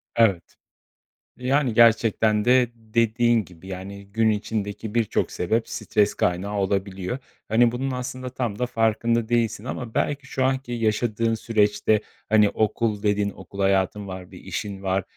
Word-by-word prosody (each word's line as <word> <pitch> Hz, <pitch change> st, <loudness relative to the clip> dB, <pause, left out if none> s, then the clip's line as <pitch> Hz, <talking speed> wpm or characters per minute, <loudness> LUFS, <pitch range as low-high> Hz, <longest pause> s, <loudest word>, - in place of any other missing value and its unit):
Evet. 100 Hz, -7 st, +3 dB, 0.9 s
Yani, 130 Hz, -1 st, +1 dB
gerçekten 110 Hz, -2 st, +4 dB
de 125 Hz, -1 st, +4 dB
dediğin 115 Hz, 0 st, +1 dB
gibi, 90 Hz, +1 st, -15 dB
yani, 100 Hz, +1 st, -7 dB
gün 110 Hz, +1 st, +3 dB
içindeki 105 Hz, 0 st, -3 dB
birçok 115 Hz, -3 st, +1 dB
sebep 110 Hz, +6 st, -1 dB
stres 105 Hz, -1 st, +1 dB
kaynağı 100 Hz, +4 st, -1 dB
olabiliyor. 95 Hz, +2 st, -1 dB, 0.3 s
Hani, 115 Hz, +1 st, +4 dB
bunun 130 Hz, +2 st, -2 dB
aslında 125 Hz, 0 st, -4 dB
tam 120 Hz, -4 st, -3 dB
da 125 Hz, -, +1 dB
farkında 115 Hz, -1 st, +1 dB
değilsin 115 Hz, -2 st, 0 dB
ama 120 Hz, -3 st, -5 dB
belki 140 Hz, -2 st, -1 dB
şu 130 Hz, -, -1 dB
anki 130 Hz, -2 st, -1 dB
yaşadığın 115 Hz, 0 st, 0 dB
süreçte, 110 Hz, -1 st, +2 dB, 0.3 s
hani, 105 Hz, -1 st, +5 dB
"Okul." 110 Hz, -1 st, 0 dB
dedin, 105 Hz, -1 st, +1 dB
okul 100 Hz, 0 st, -11 dB
hayatın 95 Hz, +1 st, +1 dB
var, 95 Hz, -1 st, -8 dB
bir -, -, -11 dB
işin 100 Hz, -1 st, -5 dB
var, 95 Hz, 0 st, 0 dB
110 Hz, 140 wpm, -24 LUFS, 100-120 Hz, 0.9 s, hani